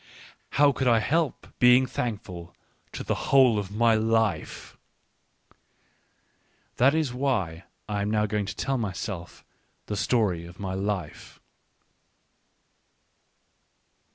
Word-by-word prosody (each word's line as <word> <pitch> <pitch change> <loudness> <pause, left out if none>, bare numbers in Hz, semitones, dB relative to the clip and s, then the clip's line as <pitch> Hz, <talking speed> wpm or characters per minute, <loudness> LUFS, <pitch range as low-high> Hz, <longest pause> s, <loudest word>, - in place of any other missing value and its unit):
How 145 0 +5
could 130 -1 -2
I 120 -2 +5
help 150 +6 0
being 125 +1 +6
thankful 100 -9 -5 0.4
to - - -6
the - - -1 0.2
whole 130 -6 +5
of 100 -2 -5
my 115 +3 +3
life? 110 -5 -1 2.0
That 135 +5 +4
is 155 -6 0
why 100 -11 -2 0.2
I 105 -1 -2
am 100 - -1
now 105 0 +1
going 105 -1 -2
to 105 - -5
tell 135 +3 -1
myself 95 -4 -5 0.4
the 105 - -4
story 95 -5 0
of 85 0 -14
my 95 -2 -4
life. 95 -4 -4
110 Hz, 115 wpm, -26 LUFS, 95-125 Hz, 2.0 s, being